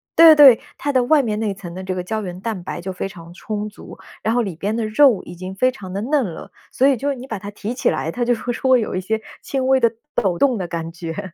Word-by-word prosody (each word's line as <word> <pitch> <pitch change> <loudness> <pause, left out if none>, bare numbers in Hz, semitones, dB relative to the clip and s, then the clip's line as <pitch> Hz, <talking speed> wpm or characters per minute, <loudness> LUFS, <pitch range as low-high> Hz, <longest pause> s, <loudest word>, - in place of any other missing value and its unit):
对 325 -1 +9
对， 275 -6 +8 0.2
它 285 0 -2
的 255 -1 +3
外 300 +1 +4
面 215 -3 -2
那 210 -3 -1
层 180 -3 -9
的 185 - -6
这 185 0 -3
个 180 - -3
胶 215 +4 -3
原 180 -2 -6
蛋 215 -6 -4
白 175 - -5
就 190 +2 -5
非 190 - -4
常 170 -2 -12
充 210 +2 -4
足， 210 - -12 0.3
然 225 - +1
后 245 - +2
里 190 -7 -4
边 205 +6 -2
的 225 - -1
肉 240 -1 +4
已 - - -10
经 185 +2 -7
非 255 +5 +2
常 190 -7 -10
地 200 +2 -3
嫩 280 0 +1
了， 170 -5 -8 0.2
所 265 - +3
以 275 - +4
就 280 +4 -1
你 260 0 -9
把 220 - -4
它 200 +2 -8
提 210 +3 -5
起 250 - +1
来， 160 +1 -2
它 245 - -2
就 245 0 +2
会 245 +2 -4
说 260 +2 0
会 255 - +6
有 210 - -3
一 185 - -1
些 220 +3 -2 0.2
轻 265 -1 -2
微 265 0 +5
的 230 -2 +3 0.2
抖 180 -4 +1
动 260 -5 +3
的 180 -2 -4
感 165 -1 -4
觉。 170 +2 -6
215 Hz, 305 characters per minute, -20 LUFS, 185-250 Hz, 0.3 s, 对